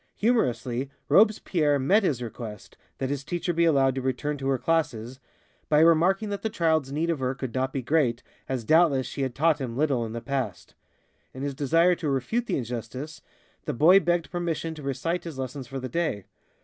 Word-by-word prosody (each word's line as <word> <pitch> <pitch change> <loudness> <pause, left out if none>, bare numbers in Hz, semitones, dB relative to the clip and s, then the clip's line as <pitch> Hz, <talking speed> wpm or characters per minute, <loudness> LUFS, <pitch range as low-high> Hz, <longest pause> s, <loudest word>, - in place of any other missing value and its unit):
Humorously, 135 - 0 0.2
Robespierre 180 -8 +3
met 165 +11 +3
his 135 - 0
request 110 -3 -8 0.2
that 135 0 -2
his 140 -1 -3
teacher 175 +3 -2
be 170 +1 +2
allowed 135 -5 +3
to 135 - -3
return 130 +3 -2
to 135 - -3
her 135 -1 +2
classes 130 -6 -1 0.5
by 150 - +4
remarking 170 +6 +4
that 200 -1 -4
the 220 - -1
child's 160 -8 +1
need 160 +4 0
of 160 - -2
her 130 0 -1
could 130 -3 -5
not 130 0 -1
be 135 -2 -3
great, 125 -4 +1 0.3
as 130 -3 -2
doubtless 155 -2 +4
she 135 +3 -5
had 130 -3 -2
taught 155 0 +2
him 120 -2 -4
little 140 -5 +1
in 110 -1 -5
the 115 - -3
past. 125 -5 -4 0.6
In 130 - -6
his 140 -1 -2
desire 165 +6 +3
to 150 - -2
refute 220 - -1
the - - 0
injustice, 125 +5 -6 0.4
the 150 - -2
boy 170 +10 +6
begged 175 -3 0
permission 170 -2 -2
to 155 - -10
recite 165 +6 -2
his 165 -5 -7
lessons 130 0 -5
for 135 0 -5
the 130 - -4
day. 155 - -2
140 Hz, 200 wpm, -26 LUFS, 130-165 Hz, 0.6 s, boy